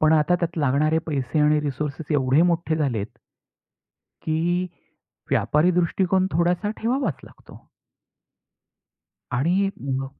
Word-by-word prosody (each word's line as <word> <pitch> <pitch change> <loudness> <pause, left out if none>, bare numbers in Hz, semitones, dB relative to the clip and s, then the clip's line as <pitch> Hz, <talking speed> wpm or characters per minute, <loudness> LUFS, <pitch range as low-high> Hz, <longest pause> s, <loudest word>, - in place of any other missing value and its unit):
पण 155 0 +4
आता 155 +3 +3
त्यात 170 -1 -2
लागणारे 150 +3 +2
पैसे 140 -1 -2
आणि 150 0 +3
रिसोर्सेस 150 +2 -4
एवढे 135 +2 +3
मोठे 170 -2 +1
झाले 140 -8 0
आहेत 100 - -7 1.1
की 155 0 0 0.9
व्यापारी 155 +5 +2
दृष्टिकोन 185 +2 +1
थोडासा 175 +4 +1
ठेवावाच 240 - 0
लागतो. - - -16 1.7
आणि 175 +10 +1
म 135 0 -2
155 Hz, 110 wpm, -23 LUFS, 140-175 Hz, 1.7 s, पण